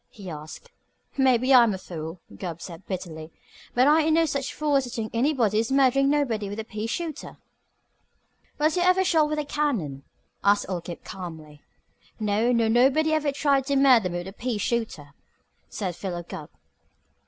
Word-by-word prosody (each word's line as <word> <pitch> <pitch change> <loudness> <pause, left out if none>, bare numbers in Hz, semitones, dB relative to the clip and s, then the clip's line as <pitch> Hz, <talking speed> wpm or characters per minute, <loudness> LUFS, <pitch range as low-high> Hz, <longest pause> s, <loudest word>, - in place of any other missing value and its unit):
he 195 -6 -9
asked. 155 0 -10 0.4
"Maybe 260 -1 +3
I'm 235 -5 +6
a - - -5
fool," 165 -2 -8
Gubb 170 -3 -6
said 170 +1 -10
bitterly, 165 -4 -6 0.4
"but 250 +2 +4
I 310 +2 +5
ain't 315 0 +2
no 330 0 +4
such 275 -3 -2
fool 300 -1 0
as 270 -1 +3
to - - -7
think 225 -2 -4
anybody 235 -4 +2
is 230 +3 -1
murdering 275 0 +4
nobody 240 -9 0
with 205 +2 -6
a - - -3
pea 215 0 -5
shooter." 320 +4 -5 1.2
"Was 305 +2 +2
you 360 - +1
ever 365 +1 +4
shot 320 -5 +3
with 305 - -2
a 300 - -2
cannon?" 230 - -2 0.4
asked 205 0 +3
old 180 -2 -4
Gabe 175 - -8
calmly. 160 -5 -9 0.6
"No, 215 +3 +1
nor 230 -2 +2
nobody 270 +7 +3
ever 305 -2 +1
tried 275 -1 +1
to 280 - +1
murder 255 -8 +5
me 175 - -3
with 175 +1 -6
a - - -12
pea 235 +1 -3
shooter," 205 - -3 0.6
said 185 -5 -4
Philo 175 -2 -5
Gubb. 170 -3 -9
230 Hz, 180 wpm, -25 LUFS, 185-280 Hz, 1.2 s, I'm